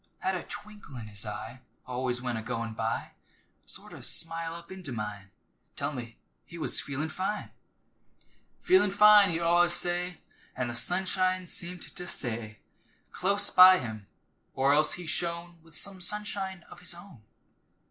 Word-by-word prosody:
Had 190 - -1
a 180 - -2
twinkle 205 -9 -10
in 120 -3 -6
his 105 +1 -5
eye 110 +4 -6 0.2
Always 125 -1 -2
when 125 -2 -1
a 110 - -3
goin' 115 0 -4
by, 110 0 -2 0.6
Sort - - -9
o' - - -10
smile 165 0 -2
up 170 +1 -11
into 185 -7 -7
mine, 105 -4 -5 0.5
Tell - - -2
me 120 -3 -7 0.3
he 170 - -11
was 160 - 0
"feelin' 145 +3 -3
fine!" 195 +6 -3 1.1
"Feelin' 365 - +5
fine," 210 0 +7
he'd 165 0 -1
allus 175 +1 +5
say, 175 0 +1 0.4
An' 125 -2 -2
th' - - -3
sunshine 185 +7 +1
seemed 175 +1 -1
to 180 - -8
stay 115 -7 -5 0.5
Close 200 +2 +1
by 185 0 +9
him, 110 - -6 0.5
or 135 +1 +4
else 150 +1 +3
he 175 - -6
shone 170 +1 -4
With 165 -1 -16
some 195 -2 -2
sunshine 195 -1 -3
of - - -14
his 180 -1 -5
own. 175 - -14
170 Hz, 160 wpm, -29 LUFS, 125-185 Hz, 1.1 s, by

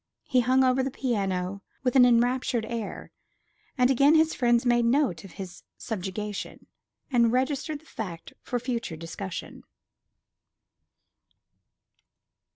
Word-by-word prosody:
He 255 - +2
hung 255 +2 +3
over 255 0 +3
the 265 - -1
piano 195 -7 -2 0.2
with 250 -1 0
an 250 -2 +8
enraptured 245 0 +2
air; 230 -2 -5 0.7
and 250 0 +4
again 280 +4 +5
his 315 0 +4
friends 240 -1 +2
made 240 -1 +3
note 235 - +1
of 195 - -12
his 185 -3 -8 0.2
subjugation, 210 -1 -5 0.5
and 235 -3 +4
registered 280 +4 -1
the - - -24
fact 180 - -7
for 245 - -2
future 235 -7 -3
discussion. 170 +3 -7
240 Hz, 120 wpm, -27 LUFS, 200-260 Hz, 0.7 s, an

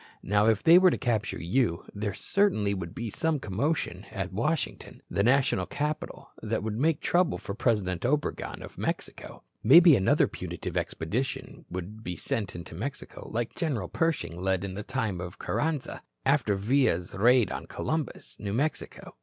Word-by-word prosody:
Now, 105 +2 +3
if 110 -3 +3
they 170 +2 +8
were 185 0 +6
to - - 0
capture 115 -4 -1
you, 90 0 0
there 105 -1 -3
certainly 110 - +1
would 85 -4 -5
be 115 -2 -4
some 160 +5 +1
commotion 110 - -2
at 95 -2 -4
Washington, 150 - -2
the - - +1
national 135 +5 +3
capital, 150 +1 -4
that - - -2
would 110 0 -3
make 155 +1 +2
trouble 175 0 +2
for 100 - -6
President 100 -6 0
Obregon 145 +4 -1
of - - -11
Mexico. - - -4 0.2
Maybe 165 +5 +9
another 95 -5 +3
punitive - - -6
expedition 120 +11 -3
would 95 +5 -6
be 90 -3 -4
sent 105 +5 -3
into 85 -2 -8
Mexico, 130 - -6
like 115 +1 -2
General 125 - -2
Pershing 160 - -1
led 95 0 +1
in 95 -1 -4
the 100 - -4
time 105 -4 -2
of 90 -1 -7
Carranza, 155 -3 -2 0.2
after 105 - +3
Villa's 100 -5 +1
raid 120 +3 +4
on - - -5
Columbus, 145 - -4
New 100 -1 -3
Mexico. 145 +7 -3
110 Hz, 160 wpm, -28 LUFS, 95-140 Hz, 0.2 s, Maybe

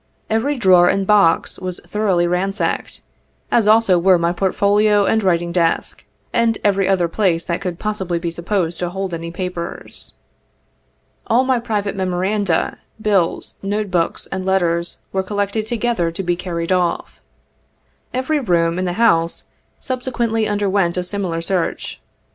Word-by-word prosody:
Every 260 +6 +1
drawer 180 -5 +5
and 195 0 +1
box 200 -5 +3
was 185 -1 -5
thoroughly 195 -5 +1
ransacked, 190 +4 -1 0.5
as 225 -3 +3
also 215 -4 +5
were 185 +1 +5
my 170 0 +1
portfolio 200 +3 +2
and 220 - +2
writing 175 -2 +1
desk, 170 -2 0 0.3
and 230 -1 +2
every 195 -2 +2
other 185 -3 +2
place 170 -2 +1
that 170 0 -2
could 180 -2 -4
possibly 190 -5 -2
be 170 0 -3
supposed 170 0 -2
to 175 - -1
hold 190 0 -4
any 165 0 -4
papers. 175 -1 -6 1.1
All 240 +3 +3
my 260 -2 +1
private 210 -4 -2
memoranda, 190 -1 0 0.2
bills, 200 -6 0
note 205 0 -2
books, 170 -2 -1
and 190 -1 -3
letters 170 -3 0 0.2
were 190 - +1
col 205 +2 -6
lected 205 +2 -1
together 230 -7 0
to 170 +4 -5
be 175 -1 0
carried 170 -1 -4
off. 180 -2 -1 0.9
Every 260 +4 0
room 170 -7 +1
in 185 - -1
the 175 - -1
house 170 -6 +2 0.3
subsequently 240 -4 -1
underwent 200 -4 0
a 180 - 0
similar 180 -3 -2
search. 180 0 -2
190 Hz, 150 wpm, -19 LUFS, 175-210 Hz, 1.1 s, drawer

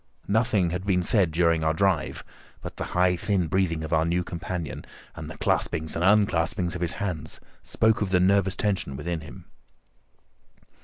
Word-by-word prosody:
Nothing 105 -4 +2
had 90 +1 -3
been 95 -3 +1
said 100 -4 +3
during 85 0 +2
our 80 0 +1
drive, 95 -3 0 0.4
but - - -8
the - - -3
high, 90 0 +4
thin 95 0 0
breathing 85 -1 0
of 80 - -4
our 80 0 +3
new 85 +2 0
companion, 85 -1 -5 0.3
and - - -7
the - - -9
claspings 80 0 -1
and 85 - -1
unclaspings 90 -3 +2
of 90 - -5
his 85 -1 -1
hands, 90 -7 -4 0.2
spoke 110 -1 +1
of 100 - 0
the 90 -1 +3
nervous 95 0 +3
tension 95 -10 -1
within 85 +3 -3
him. 80 - -12
90 Hz, 170 wpm, -26 LUFS, 80-100 Hz, 0.4 s, high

